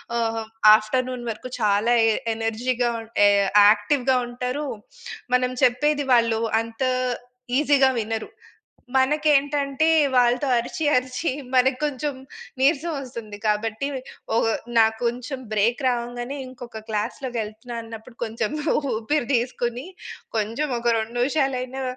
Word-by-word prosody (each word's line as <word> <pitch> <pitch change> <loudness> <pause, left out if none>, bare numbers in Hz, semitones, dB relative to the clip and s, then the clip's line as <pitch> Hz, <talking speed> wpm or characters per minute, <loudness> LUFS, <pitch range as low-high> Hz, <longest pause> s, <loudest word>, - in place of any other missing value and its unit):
ఆహ్, 230 -1 +1
హ్మ్, 225 -1 -4 0.3
ఆఫ్టర్‌నూన్ 250 +3 -1
వరకు 225 +3 -6
చాలా 210 +2 +2 0.2
ఎ - - +4 0.2
ఎనర్జీగా 240 +2 -1
ఉన్ 225 - -10 0.2
ఎ - - +7 0.4
యాక్టివ్‌గా 255 +5 +2
ఉంటరూ, 250 +4 -3 0.7
మనం 250 0 +2
చెప్పేది 290 +4 +2
వాళ్ళు 230 -2 +3 0.2
అంతా 230 +3 -2 0.7
ఈజీగా 280 -2 +4
వినరు. 220 0 -3 0.7
మనకేంటంటే, 285 +1 +2 0.3
వాళ్ళతో 245 +3 +3
అరిచి, 270 +6 -3
అరిచి 255 +5 -1 0.2
మనకి 255 0 +3
కొంచెం 290 0 -2 0.5
నీరసవొస్తుంది. 270 -8 -1
కాబట్టి, 220 +5 -1 0.5
ఒగ్ 225 - +2 0.3
నా 220 - +7 0.2
కొంచెం 250 +3 -2
బ్రేక్ 220 +5 +1
రావంగానే, 245 +3 -3
ఇంకొక 240 -4 -9
క్లాస్‌లోకెళ్తున్నా 225 +1 -4
అన్నప్పుడు, 225 +1 -11
కొంచెం 220 +1 -3 0.4
ఊపిరి 240 +4 -1
దీసుకుని, 240 +2 -1 0.5
కొంచెం 230 +8 -1
ఒక 235 0 +1
2 220 +2 -4
నిమిషాలైనా 265 -1 -1
245 Hz, 110 wpm, -23 LUFS, 225-270 Hz, 0.7 s, ఎ